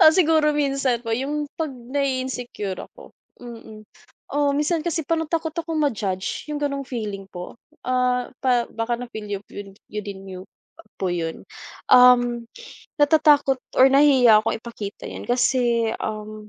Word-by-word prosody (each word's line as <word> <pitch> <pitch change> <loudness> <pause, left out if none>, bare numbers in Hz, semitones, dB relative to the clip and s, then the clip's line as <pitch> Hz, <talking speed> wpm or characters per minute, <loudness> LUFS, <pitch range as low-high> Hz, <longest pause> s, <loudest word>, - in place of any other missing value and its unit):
Ah, 315 - +8
siguro 315 -4 +3
minsan 275 -4 0
po 230 - -5
'yung 285 +5 -2
'pag 320 -2 -1
nai-insecure 255 -5 -3
ako, - - -12 0.3
mm. 225 -3 -10 0.5
Oh, 290 0 +1
minsan 300 +3 0
kasi 330 -1 -1
parang 325 -1 0
takot 325 -1 -1
ako 330 -1 -4
ma-judge 210 -9 -2
'yung 300 - -2
gano'ng 280 -2 -2
feeling 210 -6 -5
po. 180 -1 -8 0.3
Ah, 250 -1 +1
pa 245 -3 +2
baka 225 +1 -2
na 245 - -6
feel 220 -3 -7
yo 205 -1 -3
'yun 200 -1 -9 0.2
yo 210 - -3
din 200 -1 -7
niyo 185 -1 -8 0.6
po 190 - -1
'yun, 165 -2 -3 0.5
um, 245 -1 +6 0.5
natatakot 290 -2 +4 0.2
or 260 - +8
nahihiya 265 -6 +6
akong 220 - -1
ipakita 220 -3 -8
'yan - - -8
kasi, 240 -2 +2
um, 215 0 -6
250 Hz, 150 wpm, -23 LUFS, 220-290 Hz, 0.6 s, Ah